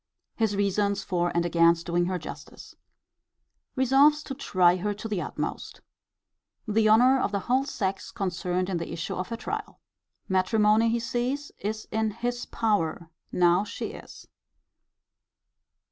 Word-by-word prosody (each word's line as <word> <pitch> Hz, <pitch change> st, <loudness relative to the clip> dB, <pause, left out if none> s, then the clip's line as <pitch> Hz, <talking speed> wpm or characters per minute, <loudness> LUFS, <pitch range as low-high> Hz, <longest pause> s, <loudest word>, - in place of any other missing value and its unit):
His 220 Hz, -3 st, 0 dB
reasons 200 Hz, 0 st, 0 dB
for 175 Hz, -2 st, 0 dB
and 170 Hz, 0 st, +2 dB
against 170 Hz, 0 st, +3 dB
doing 175 Hz, 0 st, +1 dB
her 185 Hz, +1 st, -1 dB
justice. 155 Hz, -, -10 dB, 1.0 s
Resolves 275 Hz, +3 st, +4 dB
to 270 Hz, -, -6 dB
try 185 Hz, -9 st, +3 dB
her 205 Hz, +3 st, -2 dB
to 220 Hz, +2 st, -6 dB
the 205 Hz, -5 st, -2 dB
utmost. -, -, -5 dB, 0.9 s
The 215 Hz, 0 st, +3 dB
honour 250 Hz, +5 st, +6 dB
of 205 Hz, -, 0 dB
the 200 Hz, -1 st, -1 dB
whole 255 Hz, +6 st, +1 dB
sex 195 Hz, -7 st, -3 dB
concerned 185 Hz, -4 st, -2 dB
in 190 Hz, -2 st, -1 dB
the 170 Hz, -, -5 dB
issue 160 Hz, -, -4 dB
of 185 Hz, -, -4 dB
her 230 Hz, -, -4 dB
trial. 425 Hz, -, -5 dB, 0.5 s
Matrimony, 210 Hz, +4 st, +3 dB
he 235 Hz, +1 st, +1 dB
sees, 250 Hz, +5 st, -2 dB
is 215 Hz, +2 st, -4 dB
in 220 Hz, 0 st, 0 dB
his 240 Hz, +3 st, -4 dB
power, 170 Hz, -7 st, -1 dB, 0.2 s
now 175 Hz, +2 st, +3 dB
she 210 Hz, -, -5 dB
is. -, -, -12 dB
205 Hz, 145 wpm, -27 LUFS, 180-235 Hz, 1.0 s, honour